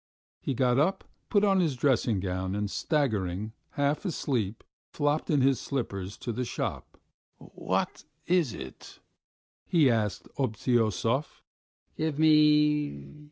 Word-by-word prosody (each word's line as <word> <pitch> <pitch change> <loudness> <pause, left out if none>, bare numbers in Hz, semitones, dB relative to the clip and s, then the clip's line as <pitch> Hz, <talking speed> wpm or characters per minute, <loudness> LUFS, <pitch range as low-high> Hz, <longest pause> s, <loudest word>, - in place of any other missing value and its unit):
He 135 - -3
got 125 +1 +2
up, 180 +7 +1 0.3
put 205 -1 +3
on 195 -2 +4
his 160 -7 +1
dressing 125 -5 +2
gown, 95 0 -2
and 105 -1 -2
staggering, 110 - -1 0.2
half 145 +1 0
asleep, 125 - -2 0.3
flopped 145 +1 0
in 145 -3 +3
his 135 -2 +3
slippers 100 -8 -4
to 120 - -4
the 125 +3 -2
shop. - - -4 0.4
"What... - - -3 0.2
is 175 -7 +2
it?" 65 -10 -10 0.7
he 160 -8 +4
asked 105 -4 -1
Obtyosov. 115 +1 0 0.5
"Give 155 -2 -2
me 150 - +3
130 Hz, 120 wpm, -28 LUFS, 105-150 Hz, 0.7 s, on